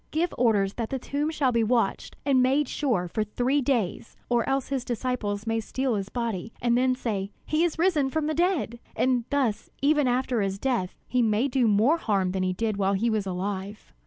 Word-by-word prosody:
Give 330 +3 0
orders 205 -5 +2
that 230 -2 -2
the 270 - -2
tomb 285 +4 -2
shall 290 -5 +1
be 230 -1 +2
watched 230 -2 0
and 270 -3 +4
made 270 +3 +2
sure 235 -13 0
for 215 +5 -1
three 250 +6 0
days, 235 -7 -1
or 240 0 +1
else 270 -1 0
his 270 -3 -1
disciples 235 -4 -2
may 225 0 0
steal 260 +3 -1
his 200 -2 -2
body, 225 -4 -3
and 240 -1 +2
then 255 +1 +3
say, 205 -6 -3 0.2
'He 310 +2 +1
is 345 -3 0
risen 320 -6 +2
from 310 +2 -1
the 310 - 0
dead'; 335 - 0 0.2
and 250 -2 +1
thus 260 -7 0
even 295 -1 +3
after 250 -2 +1
his 195 -1 -1
death 230 -6 -1
he 250 - +1
may 225 +3 +2
do 255 -3 +2
more 220 +10 +4
harm 195 - 0
than 190 0 -2
he 185 0 0
did 215 +2 -1
while 195 0 +1
he 225 +4 +1
was 210 -3 -1
alive." 190 - -4
240 Hz, 210 wpm, -26 LUFS, 205-270 Hz, 0.2 s, and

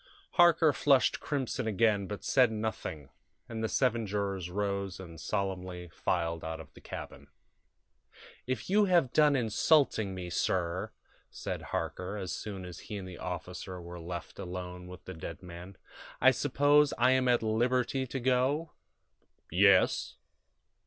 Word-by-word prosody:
Harker 165 -3 +5
flushed 135 -3 +3
crimson 130 -4 -2
again, 105 -2 +2
but 105 +1 -6
said 125 -4 +4
nothing, 105 -10 -4 0.4
and 115 -2 -5
the 110 - 0
seven 120 -4 +1
jurors 100 -3 -2
rose 100 0 -2
and 85 -4 -10
solemnly 95 -3 -3
filed 85 0 -1
out 80 0 -4
of 80 - -12
the - - -15
cabin. - - -8 1.2
"If 130 -3 -2
you 205 +2 +4
have 175 -9 +3
done 150 -2 +5
insulting 115 -3 +2
me, 90 -1 -6
sir," 90 0 -1 0.4
said - - -5
Harker, 95 +3 -3
as 95 -3 -4
soon 95 -1 -5
as 90 -1 -8
he 105 - -7
and 95 -2 -7
the 90 - -9
officer 90 +1 -5
were 85 0 -8
left 85 +2 -7
alone 90 -1 -6
with 90 0 -11
the 95 - -6
dead 80 0 -8
man, 90 +2 -10 0.4
"I - - +7
suppose 145 +1 +3
I 125 +2 +4
am 130 -1 +3
at 120 -2 +3
liberty 125 +4 +1
to 135 - -4
go?" 130 +6 +1 0.8
"Yes." 95 +2 +4
100 Hz, 145 wpm, -31 LUFS, 90-130 Hz, 1.2 s, I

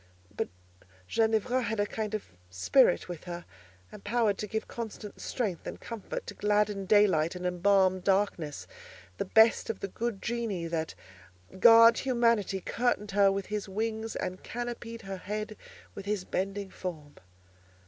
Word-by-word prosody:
But - - -1 0.6
Ginevra 225 - +1
had 225 -2 -2
a 205 - +3
kind 215 0 -3
of 215 - -6 0.2
spirit 180 - +3
with 175 -2 -7
her, 175 -1 -6 0.5
empowered 210 0 0
to 210 - -3
give 220 +2 -3
constant 220 -3 -7
strength 205 -9 -3
and - - -6
comfort, 230 -4 -6
to - - -7
gladden 210 -1 +1
daylight 190 -6 +4
and 180 0 -5
embalm 185 +1 +3
darkness; 190 -6 0 0.5
the - - 0
best 220 +4 +4
of 220 - -3
the - - -3
good 225 +1 -3
genii 225 -7 -2
that 160 -1 -2 0.6
guard 230 +1 +8
humanity 230 -7 +1
curtained 210 -1 -1
her 200 0 +5
with 195 0 -2
his 210 -1 -4
wings, 220 +2 -3
and 185 0 -4
canopied 240 -1 -6
her 195 -1 -5
head 210 +3 -4 0.4
with 200 - -9
his 205 -3 -1
bending 195 +1 -3
form. 155 -5 -6
205 Hz, 150 wpm, -29 LUFS, 190-225 Hz, 0.6 s, guard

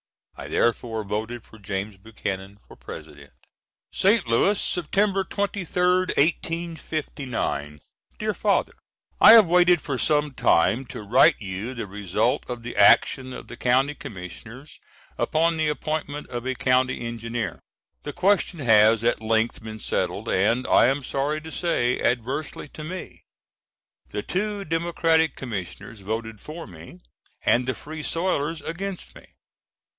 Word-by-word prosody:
I - - -8
therefore 115 -1 0
voted 110 +3 -4
for 110 - -17
James 100 +1 -4
Buchanan 100 -2 -6
for - - -14
President."] - - -11 0.6
St. 200 +1 +3
Louis, 190 - +3
Sept. 175 -4 -1 0.4
23d, 185 -2 0
1859. 145 - -2 0.4
DEAR - - -1
FATHER: - - +1 0.5
I 220 - +10
have 225 -3 +9
waited 175 0 +4
for 135 -3 -4
some 150 -2 +1
time 105 +5 +2
to 110 - -8
write 130 +9 +5
you 100 +4 -5
the 115 - -4
result 105 +5 -1
of 120 -1 -5
the 120 - -6
action 120 +5 +4
of - - -9
the - - -9
County 130 +4 +2
Commissioners 115 - -10 0.4
upon 165 +1 +1
the 155 -1 +1
appointment 150 -1 -3
of 120 +1 -5
a 130 - -1
County 125 0 +1
Engineer. 115 -5 -4 0.4
The 145 - -5
question 185 -1 +1
has 110 -2 +5
at 120 -1 +1
length 110 +1 0
been 110 -1 -7
settled, - - -2
and 115 +7 +2
I - - +5
am 135 +2 0
sorry 140 +4 -1
to 160 +1 -9
say, 125 -9 0
adversely 130 +6 -2
to 155 - -9
me. 180 +4 -7 0.9
The 105 - -4
two 205 +1 -2
Democratic 165 0 +1
Commissioners 110 -1 -6
voted 110 +1 -5
for 160 +2 -8
me, 85 -1 -13 0.4
and 125 +1 +3
the 130 - -1
Free 155 +1 -8
Soilers 165 -2 -1
against 190 +2 -5
me. - - -17
130 Hz, 140 wpm, -24 LUFS, 110-160 Hz, 0.9 s, I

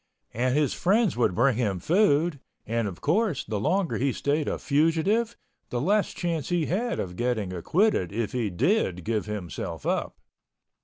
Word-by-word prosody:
And 125 +4 +1
his 150 -3 +2
friends 205 +2 +2
would 115 -6 +1
bring 125 0 +3
him 105 -6 0
food—and, 145 - 0
of 90 -4 -7
course, 170 - +1
the 105 -1 -3
longer 180 - 0
he 135 +2 +1
stayed 145 +3 -1
a - - -1
fugitive, 165 +10 +1 0.3
the 120 - -2
less 200 - +2
chance 165 -5 -3
he 175 -3 +1
had 230 +9 -1
of 90 -1 -4
getting 110 -4 -1
acquitted 125 - +1
if 110 +1 -2
he 120 -4 -1
did 95 - +1
give 110 0 -1
himself 100 -8 -5
up. - - -1
140 Hz, 160 wpm, -26 LUFS, 110-175 Hz, 0.3 s, bring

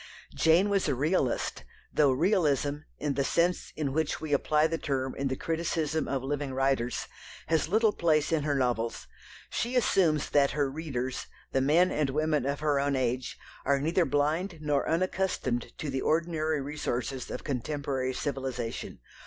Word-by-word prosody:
Jane 165 +5 +4
was 200 -3 +1
a 140 - +1
realist, 140 -1 0 0.3
though 150 -2 +4
Realism, 145 -3 +2 0.2
in 150 -2 -1
the 140 0 0
sense 170 +5 +1
in 145 -3 -2
which 160 0 0
we 155 -2 -3
apply 150 +2 +3
the 165 0 -1
term 135 -2 -1
in 140 - -2
the 130 - -1
criticism 160 0 -1
of 135 -2 -2
living 140 -1 -2
writers, 135 -3 0 0.4
has 160 -1 +2
little 220 +2 +4
place 155 -3 +2
in 160 -2 +2
her 145 0 0
novels. 120 -3 -1 0.5
She 245 +2 -1
assumes 175 - +2
that 145 0 +3
her 140 -2 +1
readers 135 -4 -4 0.2
the 135 - +2
men 165 +7 +4
and 150 -2 0
women 150 -1 +1
of 140 +1 -2
her 150 -2 +2
own 140 0 +1
age 125 0 -1 0.3
are 140 0 +2
neither 165 +5 +2
blind 160 +5 0
nor 150 -2 0
unaccustomed 170 -7 0
to 150 - -4
the 135 0 -1
ordinary 160 -2 +1
resources 135 -3 -3
of - - -5
contemporary 135 -1 -2
civilization. 130 - -4
145 Hz, 160 wpm, -29 LUFS, 135-160 Hz, 0.5 s, Jane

